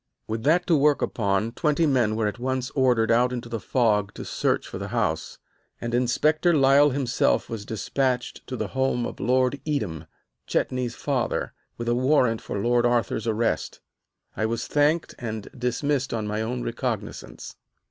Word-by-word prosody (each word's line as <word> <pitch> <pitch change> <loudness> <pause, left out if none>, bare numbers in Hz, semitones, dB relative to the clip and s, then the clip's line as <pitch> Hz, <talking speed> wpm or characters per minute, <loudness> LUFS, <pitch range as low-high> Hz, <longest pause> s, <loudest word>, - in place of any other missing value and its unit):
With 110 +1 -3
that 170 +4 +4
to 170 - +3
work 145 0 +3
upon, 100 0 0
twenty 150 +5 +1
men 125 -7 +2
were 110 0 0
at 105 +3 -2
once 130 +1 -2
ordered 125 -4 +2
out 125 +2 +3
into 120 -1 -4
the 115 -1 -4
fog 105 -5 +1
to - - -7
search - - 0
for - - -7
the - - -4
house, - - -1 0.4
and 120 0 -4
Inspector 150 +7 +2
Lyle 140 +1 +6
himself 130 -3 +1
was 105 -3 -5
despatched 125 +3 -2
to 130 - -4
the - - -3
home 130 -2 0
of - - -6
Lord 130 +4 +1
Edam, 100 - -3 0.4
Chetney's 125 -2 -1
father, 135 -4 -1 0.2
with 120 - -5
a 120 - +3
warrant 125 -2 +2
for - - -5
Lord 120 +4 +2
Arthur's 120 -2 +1
arrest. 115 +1 -1 0.6
I 110 - 0
was 115 +1 -2
thanked 150 +3 +1
and 110 -3 -5
dismissed 130 +1 -1
on 110 -2 -2
my 105 +1 -2
own 120 +2 -3
recognizance. 115 -3 -5
120 Hz, 170 wpm, -25 LUFS, 115-135 Hz, 0.6 s, Lyle